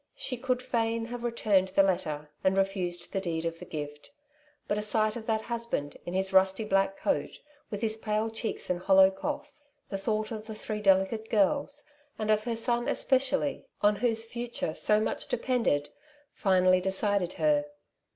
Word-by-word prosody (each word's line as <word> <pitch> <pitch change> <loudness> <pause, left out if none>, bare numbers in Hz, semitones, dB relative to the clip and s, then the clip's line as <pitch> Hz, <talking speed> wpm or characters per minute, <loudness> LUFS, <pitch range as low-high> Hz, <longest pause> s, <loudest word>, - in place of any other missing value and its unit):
She 255 - -3
could 255 0 -1
fain 230 -2 0
have 240 0 -6
returned 215 -5 +2
the 195 +1 +4
letter, 155 -6 -1
and 190 0 +2
refused 185 -3 -1
the 195 - 0
deed 165 -3 -2
of 165 0 -3
gift; 150 -1 -6 0.6
but 205 - 0
a - - -1
sight 215 0 +2
of 225 -2 -7
that 220 -1 0
husband 235 -12 -3
in 175 - -3
his 190 0 0
rusty 190 +2 +4
black 195 -1 +1
coat, - - -1 0.3
with 205 -1 -5
his 220 -1 0
pale 215 0 -1
cheeks 225 0 -4
and 175 - -1
hollow 190 +1 +6
cough; 290 +8 -5 0.3
the 195 - -3
thought 215 +2 -1
of 215 -1 -6
the 220 - -6
three 215 0 -5
delicate 195 +3 +2
girls, 280 +7 +1 0.3
and 215 0 0
of 215 0 +2
her 235 -1 -1
son 240 +1 0
especially, 275 +1 +1 0.2
on 205 0 +4
whose 225 0 0
future 235 -8 -4
so 210 +5 +3
much 215 - -2
depended, 230 - 0 0.4
finally 185 -2 +3
decided 190 -1 +1
her. 150 -2 +2
210 Hz, 170 wpm, -29 LUFS, 190-230 Hz, 0.6 s, hollow